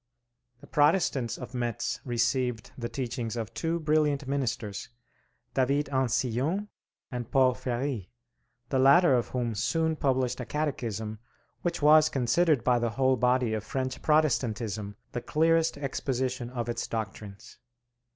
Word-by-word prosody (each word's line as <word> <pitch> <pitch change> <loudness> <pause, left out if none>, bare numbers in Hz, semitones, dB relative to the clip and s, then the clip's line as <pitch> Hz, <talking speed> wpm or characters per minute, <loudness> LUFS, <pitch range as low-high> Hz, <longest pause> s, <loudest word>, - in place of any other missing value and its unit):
The - - -12
Protestants 145 -5 +2
of - - -8
Metz 120 +1 -2
received 120 -1 0
the 120 -2 -4
teachings 120 -3 -3
of 110 -5 -4
two 165 +1 -1
brilliant 150 -3 +1
ministers, 120 -7 -2 0.6
David 140 +2 +1
Ancillon 130 - 0 0.4
and 120 -2 -5
Paul 130 -2 +4
Ferri, 125 -4 -3 0.6
the 135 - +1
latter 140 +4 +6
of 120 -2 +2
whom 120 -2 -2
soon 160 +9 0
published 130 -4 0
a 125 - -4
Catechism 115 -8 -3 0.4
which 170 -3 -2
was 155 +1 +7
considered 140 +2 +2
by 125 -1 +3
the 120 0 0
whole 130 +3 +2
body 125 -1 +2
of 110 -1 -2
French 130 +2 -3
Protestantism 115 -9 0 0.2
the 120 - -3
clearest 165 +2 +2
exposition 130 -3 -2
of 120 -2 -4
its 120 - -3
doctrines. 110 0 -6
130 Hz, 130 wpm, -28 LUFS, 120-145 Hz, 0.6 s, was